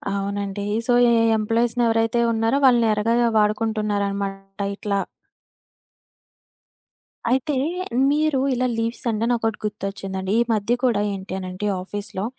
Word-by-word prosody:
అవునండి. 200 0 -3 0.2
సో, 245 - +3 0.2
ఎ - - +4 0.2
ఎంప్లాయీస్‌ని 230 +2 +1
ఎవరైతే 225 +1 +1
ఉన్నారో 225 +3 +1
వాళ్ళని 240 -3 +5
ఎరగా 210 +2 +1 0.3
వాడుకుంటున్నారన్నమాట 200 -2 -1
ఇట్లా. 200 -1 -1 2.3
అయితే 265 +4 +1 0.5
మీరు 300 -1 +2
ఇలా 255 0 0
లీవ్స్ 230 +1 -3
అంటే 225 0 0
నాకోటి 225 -2 0
గుర్తొచ్చిందండి. 195 -2 -4
ఈ - - +4
మధ్య 215 +2 0
కూడా 235 -5 +2
ఏంటి 190 -1 -7
అనంటే, 185 +2 -5 0.2
ఆఫీస్‌లో 200 0 -5
210 Hz, 110 wpm, -22 LUFS, 200-230 Hz, 2.3 s, వాళ్ళని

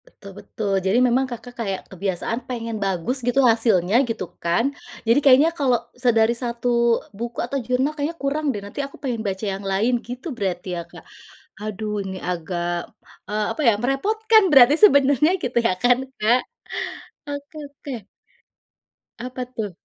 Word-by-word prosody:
Betul - - -13
betul. 205 -3 -4
Jadi 190 +4 +3
memang, 255 +2 +2
Kakak, 245 0 -8
kayak, 195 -4 -2
kebiasaan 195 +4 -2
pengen 230 -3 -4
bagus 195 +7 -1
gitu, 245 +2 +1
hasilnya, 225 -5 +3
gitu 225 -4 -3 0.2
kan. 175 +12 +1 0.3
Jadi 230 +4 +4
kayaknya, 280 +3 +6
kalau 270 -7 +2 0.2
se 250 0 0
dari 225 0 +4
1 240 0 -3 0.5
buku 235 +1 -5
atau 275 +3 -3
jurnal 250 +5 0
kayaknya 310 +2 -3
kurang 290 +2 -2
deh, 210 -6 -2
nanti 205 +8 -5
aku 275 0 -7
pengen 245 -5 -2
baca 195 +2 -3
yang 195 - -6
lain, 195 +6 +1
gitu 250 +5 -8
berarti 185 -2 -3
ya, - - -3
Kak. - - -13 0.6
Aduh! 215 0 -4
Ini 190 0 -5
agak, 175 0 -3 0.6
eee, 210 0 0
apa - - -4
ya 230 - +7
merepotkan 435 - +3
berarti 270 0 +8
sebenarnya, 285 - +4
gitu 245 - -2
ya - - +1
kan, 245 0 +5 0.2
Kak. 235 +4 +4 0.9
Oke 285 +2 -7
oke. 270 -6 -8 1.1
Apa 250 +1 -5
tuh? 210 -3 -3
240 Hz, 155 wpm, -22 LUFS, 210-270 Hz, 1.1 s, berarti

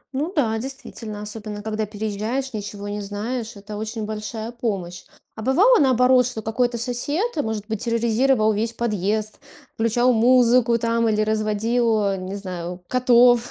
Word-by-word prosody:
Ну 300 +6 -1
да, 230 -8 +1
действительно, 225 -4 -7
особенно 210 -1 -6
когда 215 0 -2
переезжаешь, 220 +5 -3
ничего 205 -1 -6
не 205 0 -4
знаешь, 220 +4 -4
это 205 +1 -8
очень 220 0 -4
большая 220 +1 -5
помощь. 195 -7 -4 0.3
А 220 - -7
бывало 385 - +4
наоборот, 255 -2 +4
что 225 -4 -6
какой-то 240 +2 0
сосед, 285 - -1
может 220 -7 -2
быть, 220 -2 -3
терроризировал 230 0 +2
весь 225 +3 -1
подъезд, 215 -1 -2 0.3
включал 240 +3 +2
музыку 240 0 +4
там 230 0 +1
или 215 0 +1
разводил, 220 +1 +1
э, 195 - -1
не 185 +1 -5
знаю, 180 -2 -6
котов, 245 0 +4
225 Hz, 145 wpm, -22 LUFS, 210-245 Hz, 0.3 s, бывало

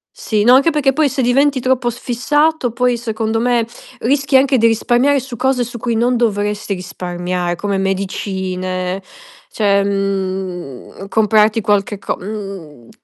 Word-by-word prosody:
Sì 215 - -1
no 245 +3 +6
anche 275 +5 +5
perché 290 -4 +1
poi 300 0 +2
se 260 0 -1
diventi 270 +2 +3
troppo 255 -1 +1
s 240 - -7
fissato 295 +4 +1
poi 245 +1 0
secondo 225 -1 -2
me 240 -1 +1 0.4
rischi 275 +2 +2
anche 265 -2 +3
di 230 - +5
risparmiare 245 +5 +2
su 255 -1 -8
cose 255 -1 +1
su 235 0 -7
cui 235 -1 -1
non 245 +2 +2
dovresti 205 -3 -1
risparmiare 180 -1 -3
come 200 +1 -2
medicine, 190 -1 -3 0.5
cioè 200 -2 +2
mhmm 190 -5 -3
comprarti 215 +1 +3
qualche 205 -1 0
co - - -3
mhmm, 190 - -8
220 Hz, 145 wpm, -17 LUFS, 195-250 Hz, 0.5 s, no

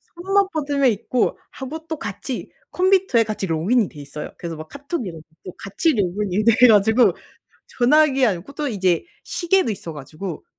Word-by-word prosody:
손만 390 +3 +1
뻗으면 285 -3 +1
있고. 230 +3 -1
하고 310 +5 -7
또 320 - -4
같이 220 +5 -6 0.2
컴퓨터에 370 -9 +3
같이 215 -3 -3
로그인이 185 +7 +1
돼 150 - -13
있어요. 145 +1 -8
그래서 170 -2 -5
막 155 0 -9
카톡 285 -1 -5
이런 165 -3 -8 0.2
것도 185 - -9
같이 250 - 0
로그인이 205 -1 -1
돼 235 +2 +6
가지고 220 +2 +5 0.7
전화기 270 +1 +4
아이 205 -5 +1
그리고 175 +11 -11
또 295 +1 -3
이제 185 -7 +1 0.2
시계도 365 -5 +1
있어 185 -5 -6
가지고 155 +4 -7
230 Hz, 370 characters per minute, -21 LUFS, 185-290 Hz, 0.7 s, 돼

